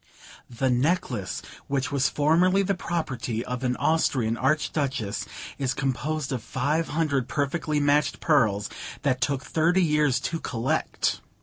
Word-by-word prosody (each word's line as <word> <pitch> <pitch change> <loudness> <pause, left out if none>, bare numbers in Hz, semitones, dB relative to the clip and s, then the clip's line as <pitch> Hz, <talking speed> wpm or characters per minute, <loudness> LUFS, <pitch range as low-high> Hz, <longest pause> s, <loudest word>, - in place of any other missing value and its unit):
'The 130 +2 0
necklace, 125 - 0 0.2
which 135 -1 -1
was 135 -2 +2
formerly 175 +6 +3
the 200 - +1
property 130 - -3
of 125 +1 -4
an 125 -1 +1
Austrian 130 -8 +1
Archduchess, 135 -5 0 0.3
is 130 -2 0
composed 135 +2 -2
of 130 -3 -2
five 145 +8 -1
hundred 145 -5 0
perfectly 150 +1 -1
matched 145 0 +2
pearls 110 -10 +2 0.4
that 130 -3 +1
took 140 -1 0
thirty 170 +5 +2
years 150 -4 +3
to 165 - -3
collect. 120 -3 -1
140 Hz, 130 wpm, -26 LUFS, 125-155 Hz, 0.4 s, formerly